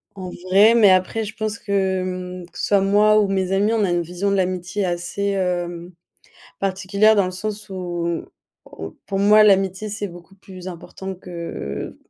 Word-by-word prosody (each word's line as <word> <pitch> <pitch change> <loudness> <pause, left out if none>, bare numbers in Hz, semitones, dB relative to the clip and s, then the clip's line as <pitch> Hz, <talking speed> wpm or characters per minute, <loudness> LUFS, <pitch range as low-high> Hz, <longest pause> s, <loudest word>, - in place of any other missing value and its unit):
en 185 -2 -7 0.2
vrai, 205 +4 +6
mais 215 -4 +6
après 185 +4 +2
je 210 +1 -7
pense 215 0 -3
que, 190 -2 0
mmh, 180 -1 -6
que - - -13
ce - - -1
soit 200 -1 +4
moi 210 +2 +4
ou 205 - +1
mes 190 -1 -1
amis, 205 +3 +2
on 220 - +2
a 190 - +1
une 175 0 +1
vision 180 +4 -2
de - - +2
l'amitié 185 +1 -1
assez, 180 +3 -2
hem, 175 -2 -2 0.7
particulière 195 +3 +2
dans 200 -2 +3
le 185 - -3
sens 210 +2 -5
où 175 -3 -3 0.4
où 80 0 -9
pour 195 -1 -2
moi, 210 +2 +6
l'amitié, 195 0 +2
c'est 210 0 -4
beaucoup 175 +1 -13
plus 185 -1 -11
important 190 +2 -7
que 170 - -6
190 Hz, 185 wpm, -21 LUFS, 180-205 Hz, 0.7 s, vrai